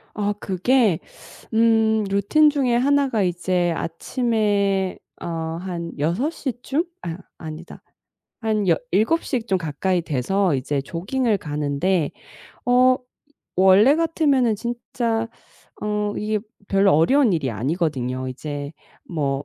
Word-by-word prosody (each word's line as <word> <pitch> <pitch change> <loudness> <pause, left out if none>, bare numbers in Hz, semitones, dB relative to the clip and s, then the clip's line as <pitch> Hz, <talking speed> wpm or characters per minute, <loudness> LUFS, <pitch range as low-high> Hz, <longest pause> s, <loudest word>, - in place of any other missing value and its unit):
아 205 -1 0
그게 195 -1 +2 0.5
음 220 -1 +3
루틴 200 +11 +4
중에 270 -5 +1
하나가 270 -3 +2
이제 180 -1 0
아침에 200 0 0 0.2
어 165 -1 -3 0.2
한 175 -3 -5
6:00 250 - -1
쯤? 310 +6 0 0.2
아 170 +1 -5 0.2
아니다 160 +1 -9 0.6
한 215 -3 0
여 165 - +5 0.2
7:00 245 - +1
좀 190 -2 +2
가까이 175 +3 -1
돼서 170 +5 0
이제 135 +2 -1
조깅을 205 - -1
가는데 150 +3 -1 0.6
어 255 +1 +5 0.6
원래 190 +8 +6
같으면은 285 -9 +2
진짜 235 -1 -2 0.5
어 210 0 -1
이게 215 0 -1 0.3
별로 195 0 +4
어려운 250 - +4
일이 145 -6 0
아니거든요. 130 - -2
이제 145 +2 -6 0.4
뭐 140 -4 -1
195 Hz, 205 characters per minute, -22 LUFS, 165-235 Hz, 0.6 s, 원래